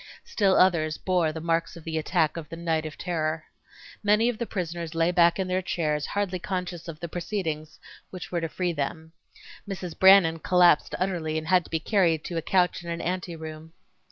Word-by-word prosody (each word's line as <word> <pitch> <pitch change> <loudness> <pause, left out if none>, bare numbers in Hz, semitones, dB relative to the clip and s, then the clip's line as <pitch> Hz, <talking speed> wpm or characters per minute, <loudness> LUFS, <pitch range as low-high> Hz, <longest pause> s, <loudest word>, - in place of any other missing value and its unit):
Still 195 -3 +2
others 160 -4 +3
bore 180 -4 +1
the 160 - -6
marks 165 +1 -1
of 165 - -12
the 160 0 -2
attack 155 0 +1
of 160 -3 -7
the 165 - -6
"night 165 -2 -1
of 150 - -10
terror." 160 -3 -2 0.6
Many 210 +3 +3
of 240 - -4
the 235 - -2
prisoners 170 -3 -4
lay 165 +1 +2
back 170 -1 +4
in 190 -1 -1
their 185 0 0
chairs 150 -5 -1
hardly 200 -3 -2
conscious 180 -2 -4
of 160 -2 -7
the 170 - -5
proceedings 165 -3 -4 0.3
which 185 -2 -8
were 175 -1 -1
to. 165 - -2
free 180 +1 -2
them. 160 +2 -4 0.6
Mrs. 185 -3 -5
Brannan 190 -4 +7
collapsed 175 -2 +4
utterly 170 -4 -1
and 155 0 -4
had 185 -2 +4
to - - -13
be 160 - -1
carried 170 -4 +2
to 170 - -4
a - - 0
couch 180 +1 +1
in 170 - -7
an 170 0 -3
ante 180 -1 -3
room. 160 0 -9
170 Hz, 205 wpm, -26 LUFS, 160-185 Hz, 0.6 s, Brannan